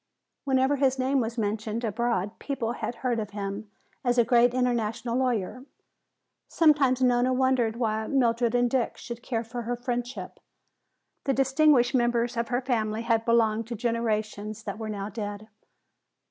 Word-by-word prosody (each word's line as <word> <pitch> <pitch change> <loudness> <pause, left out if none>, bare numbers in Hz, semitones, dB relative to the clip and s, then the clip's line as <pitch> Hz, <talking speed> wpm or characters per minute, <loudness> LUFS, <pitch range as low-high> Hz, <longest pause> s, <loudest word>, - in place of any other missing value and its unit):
Whenever 265 +1 +2
his 270 -1 +2
name 265 +1 +1
was 230 0 -2
mentioned 215 +1 -2
abroad 225 -2 -1
people 270 -5 -3
had 240 - -4
heard 240 -2 +1
of 210 -2 -4
him 200 +1 -4 0.3
as 245 -1 +1
a 240 - +6
great 240 +1 +4
international 235 -2 -1
lawyer. 250 -2 -1 0.8
Sometimes 280 -5 +3
Nona 245 0 +3
wondered 255 -3 +2
why 220 -2 -1
Mildred 240 -3 +1
and 245 0 +3
Dick 245 -1 -1
should 235 -1 -8
care 235 -2 -2
for 240 +1 -6
her 240 +1 -2
friendship. 245 +1 -4 0.9
The 270 -2 +1
distinguished 270 -1 +4
members 240 -1 +1
of 235 0 -1
her 245 +1 0
family 225 -3 -1
had 230 -1 +1
belonged 225 -1 +2
to 235 - -4
generations 215 -2 -2
that 205 0 -5
were 220 -1 -4
now 205 -1 -4
dead. 205 0 -6
235 Hz, 155 wpm, -27 LUFS, 220-255 Hz, 0.9 s, a